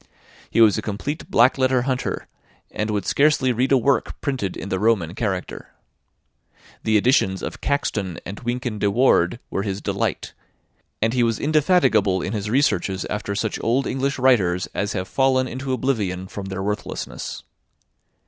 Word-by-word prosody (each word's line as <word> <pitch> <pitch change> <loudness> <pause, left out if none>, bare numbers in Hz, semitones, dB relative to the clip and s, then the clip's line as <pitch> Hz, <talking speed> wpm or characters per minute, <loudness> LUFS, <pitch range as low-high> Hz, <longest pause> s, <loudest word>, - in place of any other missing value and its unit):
He 115 - +2
was 110 -1 +5
a - - -3
complete 110 +9 -5
black 125 +3 +4
letter 130 -1 +2
hunter, 130 -1 -2 0.5
and 105 +1 -2
would 105 -3 -1
scarcely 140 -3 +3
read 125 +3 0
a 135 - +6
work 130 +3 0
printed 130 -10 -2
in 95 - -6
the 95 - -1
Roman 100 -6 +1
character. 95 -4 -4 1.1
The 110 -1 +3
editions 100 -4 +2
of - - -6
Caxton 105 -11 -1
and 100 +2 -6
Wynkin 120 -2 -3
de 100 - +2
Worde 105 -4 +3
were - - -1
his 100 -1 -3
delight; - - -2 0.7
and 110 +1 +1
he 125 - +2
was 115 -2 +2
indefatigable 145 - +3
in 100 - -3
his 105 -1 -3
researches 105 -7 +1
after 105 -1 -3
such 110 +1 -2
old 125 +4 +1
English 135 +1 -1
writers 100 -9 +3
as 100 0 -2
have 95 -2 -3
fallen 130 -1 +2
into 130 +2 -5
oblivion 105 -8 -1
from 100 +1 -7
their 95 0 -4
worthlessness. 105 +1 -4
110 Hz, 160 wpm, -22 LUFS, 100-130 Hz, 1.1 s, a